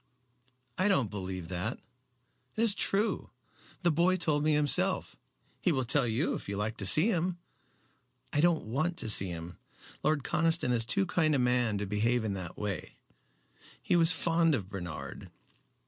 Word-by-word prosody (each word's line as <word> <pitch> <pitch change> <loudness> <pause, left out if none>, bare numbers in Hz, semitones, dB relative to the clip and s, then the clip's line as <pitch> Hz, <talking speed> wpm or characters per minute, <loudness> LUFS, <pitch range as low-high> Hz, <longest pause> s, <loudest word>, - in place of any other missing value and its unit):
"I 185 - +3
don't 135 - +1
believe 95 -3 -5
that." 95 +7 -3 0.8
"It 220 - -1
is 225 -3 +8
true. 205 +2 -1 0.5
The 175 - +3
boy 175 +4 +2
told 150 -4 +1
me 155 0 +2
himself. 150 -1 +1 0.5
He - - +2
will 130 -4 0
tell 125 +1 +2
you 115 +7 0
if - - -6
you 100 - -3
like 105 +2 -2
to 100 - 0
see 155 - +5
him." 180 -1 -1 1.0
"I 145 - +2
don't 170 -5 +2
want 155 +10 -2
to 110 - 0
see 100 -2 +6
him. 85 0 -7 0.4
Lord 155 -2 0
Conniston 165 -4 0
is 115 -2 0
too 195 +10 +2
kind 160 -4 +1
a - - +2
man 125 -4 +1
to 105 - -3
behave 110 +4 0
in 105 -2 -2
that 90 -3 -7
way. 105 -3 -5 0.8
He - - 0
was 165 0 +5
fond 165 -2 +1
of 100 -7 -5
Bernard." 85 -8 -7
130 Hz, 170 wpm, -30 LUFS, 105-165 Hz, 1.0 s, is